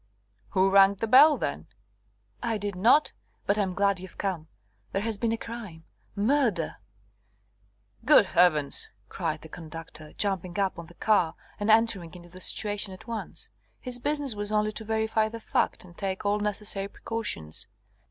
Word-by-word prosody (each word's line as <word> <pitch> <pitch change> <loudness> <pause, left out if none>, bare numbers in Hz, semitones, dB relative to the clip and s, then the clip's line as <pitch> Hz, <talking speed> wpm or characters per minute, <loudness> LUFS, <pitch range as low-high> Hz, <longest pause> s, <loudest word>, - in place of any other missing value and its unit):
"Who 190 +1 +3
rang 195 0 +6
the 225 - -2
bell, 280 +7 +7
then?" - - -3 0.7
"I 230 -2 -1
did 205 0 -3
not. 235 +11 +4 0.3
But 205 +1 +1
I'm 190 -3 0
glad 200 -1 +2
you've 185 -1 -11
come. 180 -6 -3 0.4
There 195 - -1
has 225 -1 -1
been 230 -1 +1
a 230 - 0
crime 225 -9 -8 0.3
murder." 215 - +1 1.3
"Good 270 -4 +7
Heavens!" 155 -6 +2 0.2
cried 160 -4 -3
the - - -9
conductor, 160 -1 -9
jumping 185 -3 -1
up 195 -3 0
on 170 - -8
to 175 - -16
the - - -38
car, 195 -7 +2 0.2
and 205 +1 -1
entering 220 -6 +3
into 175 -1 -12
the 185 +2 -11
situation 205 -1 -1
at 185 - -16
once. 215 -7 -6 0.3
His 250 -1 -2
business 290 -1 +1
was 205 0 -3
only 215 0 +1
to 220 - -8
verify 220 0 0
the 230 +1 -7
fact, 220 - -1
and 175 -1 -15
take 190 +1 -3
all 205 +1 +2
necessary 205 -1 -1
precautions. 200 - -4
200 Hz, 165 wpm, -27 LUFS, 180-220 Hz, 1.3 s, bell